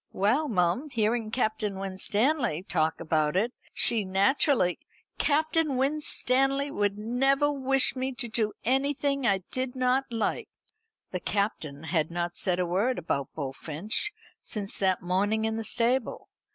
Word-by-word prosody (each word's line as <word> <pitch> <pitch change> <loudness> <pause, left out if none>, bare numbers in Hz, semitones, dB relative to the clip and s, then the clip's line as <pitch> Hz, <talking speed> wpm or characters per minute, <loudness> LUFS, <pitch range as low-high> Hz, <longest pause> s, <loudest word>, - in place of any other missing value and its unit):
"Well, 240 +11 +2
mum, 190 - 0
hearing 225 -2 0
Captain 215 -4 -1
Winstanley 205 - 0
talk 160 -4 0
about 155 -1 0
it, 230 +6 0 0.2
she 225 -3 +3
naturally 195 - +2 0.2
" - - -48
"Captain 310 -1 +1
Winstanley 275 0 +2
would 205 -5 0
never 270 +6 +1
wish 270 -1 +2
me 260 +1 -2
to 245 -1 -4
do 220 -2 -1
anything 275 +1 +1
I 195 -2 +1
did 255 0 -3
not 255 +1 +1
like." 230 -2 -2 0.6
The 180 - -3
Captain 175 -8 -2
had 160 -1 0
not 175 0 -3
said 180 -2 +2
a 180 - 0
word 200 +9 0
about 140 -5 -2
Bullfinch 155 - -2 0.3
since 205 -2 -3
that 190 -2 +1
morning 205 +5 +1
in 220 0 -1
the 225 - -3
stable. 240 +3 0
220 Hz, 140 wpm, -27 LUFS, 185-265 Hz, 0.6 s, she